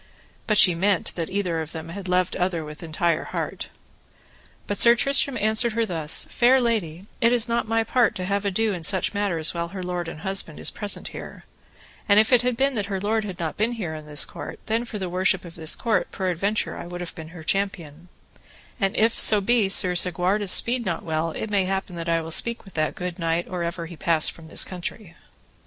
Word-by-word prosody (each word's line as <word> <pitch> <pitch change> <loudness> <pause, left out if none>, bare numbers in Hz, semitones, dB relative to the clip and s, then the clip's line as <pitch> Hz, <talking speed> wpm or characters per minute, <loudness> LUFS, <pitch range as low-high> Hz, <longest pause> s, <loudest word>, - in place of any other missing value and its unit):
But 215 - +2
she 185 -3 +8
meant 190 +3 0
that 165 -2 -4
either 180 -5 -1
of 160 0 -7
them 160 0 -7
had 190 +2 -7
loved 180 0 +1
other 175 -3 -1
with 150 0 -10
entire 165 0 -1
heart. - - -4 1.0
But 205 - -3
Sir 235 0 +7
Tristram 275 +1 +2
answered 220 +2 +2
her 230 0 +1
thus: 160 -6 0
Fair 255 +2 +4
lady, 200 -8 -1 0.2
it 230 - +4
is 245 -1 +2
not 235 -1 -1
my 225 0 +1
part 240 0 +2
to 185 - -4
have 200 +1 -1
ado 205 +2 0
in 175 -3 -6
such 190 +5 +1
matters 190 -6 0
while 170 -1 -3
her 185 +1 -7
lord 180 -1 -3
and 160 -1 -8
husband 190 -4 -2
is - - 0
present 205 -1 -2
here; - - -9 0.7
and 200 +1 +7
if 220 +4 +3
it 245 - +6
had 245 -1 -1
been 275 +1 +2
that 205 -4 -2
her 195 -2 -2
lord 215 +3 0
had 190 -4 -6
not 165 -2 -4
been 225 +3 +1
here 190 -9 -4
in 155 -1 -9
this 150 -1 +2
court, - - -8
then 225 +2 -1
for 230 -2 -6
the 190 -2 -3
worship 185 +1 +1
of 170 - -10
this 160 -1 -2
court 220 -7 0
peradventure 190 +3 -1
I - - -7
would 175 0 -7
have 175 - -6
been 160 -1 -9
her 165 0 -11
champion, 175 -4 -2 0.7
and 195 -3 0
if 225 +1 +2
so 210 - +6
be 215 0 +2
Sir 185 -2 +4
Segwarides 180 +3 +2
speed 240 +1 +3
not 180 -6 -3
well, 160 0 -1
it 210 +6 -5
may 195 -2 +2
happen 190 -1 -3
that 170 0 -4
I 165 0 +2
will 165 - -7
speak 235 +8 +1
with 195 - -14
that 155 -1 -1
good 180 -1 -5
knight 165 0 -1
or 180 -1 -4
ever 170 0 -3
he 170 +1 -9
pass 160 -2 +2
from 165 -1 -12
this - - +1
country. 180 0 -7
185 Hz, 225 wpm, -24 LUFS, 170-215 Hz, 1.0 s, she